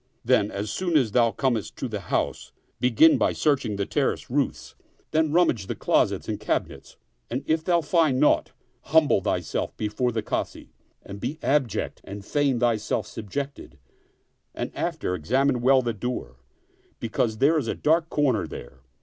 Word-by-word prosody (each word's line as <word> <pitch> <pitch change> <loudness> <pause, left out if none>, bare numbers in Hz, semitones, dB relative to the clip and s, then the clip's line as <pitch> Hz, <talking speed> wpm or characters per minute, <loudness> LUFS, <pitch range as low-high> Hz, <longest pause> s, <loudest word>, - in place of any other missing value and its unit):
Then, 115 -4 +3
as 105 +1 -4
soon 175 - +1
as 125 -7 +1
thou 120 0 +4
comest 120 -3 -1
to 130 - -4
the 110 -3 -4
house, 95 - -2 0.3
begin 125 +6 +5
by - - +2
searching 140 -8 0
the 100 0 -1
terrace - - -1
roofs; - - -1 0.4
then 155 -1 +2
rummage 150 - +2
the - - -3
closets - - +1
and - - -3
cabinets; - - -3 0.3
and 130 +3 -3
if 160 +1 +1
thou 170 -1 +2
find 155 -4 +2
naught, 150 - +3 0.4
humble 150 -8 +4
thyself - - -2
before 110 +4 -1
the 110 -1 -2
Kazi - - -4 0.3
and 100 0 -9
be 150 - -4
abject 135 -4 0
and 100 0 -9
feign 140 -2 +1
thyself 110 -3 0
subjected, 115 - -6 0.8
and - - -4
after 90 - -2
examine 125 - +1
well 130 +1 +4
the 120 -1 -1
door, 105 - -5 0.6
because 110 -1 -1
there 155 +6 +4
is 130 - -4
a - - -1
dark 160 +2 +2
comer 130 -10 +1
there. - - -10
125 Hz, 160 wpm, -25 LUFS, 105-145 Hz, 0.8 s, begin